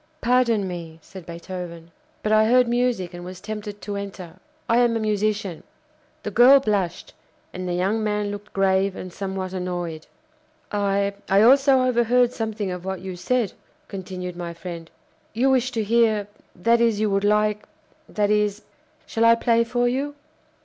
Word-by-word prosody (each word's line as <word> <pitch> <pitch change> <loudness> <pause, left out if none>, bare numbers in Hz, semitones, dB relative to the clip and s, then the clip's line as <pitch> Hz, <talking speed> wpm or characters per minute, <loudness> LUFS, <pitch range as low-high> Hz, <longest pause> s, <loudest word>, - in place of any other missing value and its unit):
"Pardon 235 -6 +2
me," 170 -3 -7
said 190 -4 -12
Beethoven, 170 -1 -8 0.3
"but 215 - 0
I 215 0 +5
heard 250 +1 +4
music 240 -7 0
and 175 0 -8
was 180 +1 -8
tempted 210 0 -7
to 205 - -4
enter. 195 -4 -7 0.3
I 230 +1 +3
am 240 -2 +3
a - - -2
musician." 210 -4 -1 0.6
The - - -4
girl 265 +3 +7
blushed, 205 -8 -2 0.4
and 185 0 -5
the 175 - -1
young 200 +5 0
man 210 -1 -1
looked 205 +1 -8
grave 195 0 +1
and 185 -1 -8
somewhat 190 -1 -4
annoyed. 175 -3 -4 0.6
"I 200 -1 0 0.2
I 195 +2 +5
also 270 +1 +5
overheard 245 0 +3
something 215 -3 -3
of 180 -1 -6
what 190 -1 -4
you 190 -1 -6
said," 220 +4 0 0.4
continued 185 -2 -6
my 170 -1 -6
friend. 170 -1 -8 0.4
"You 255 +4 +2
wish 255 -1 +2
to 225 - 0
hear 220 -2 +2 0.3
that 230 +6 +2
is, 230 -3 +2
you 215 -1 +1
would 195 0 +1
like 210 0 +2 0.4
that 210 -1 0
is 210 0 +1 0.4
shall 225 - -1
I 230 0 +7
play 230 0 +2
for 245 +1 0
you?" 275 +4 -2
205 Hz, 165 wpm, -23 LUFS, 185-230 Hz, 0.6 s, girl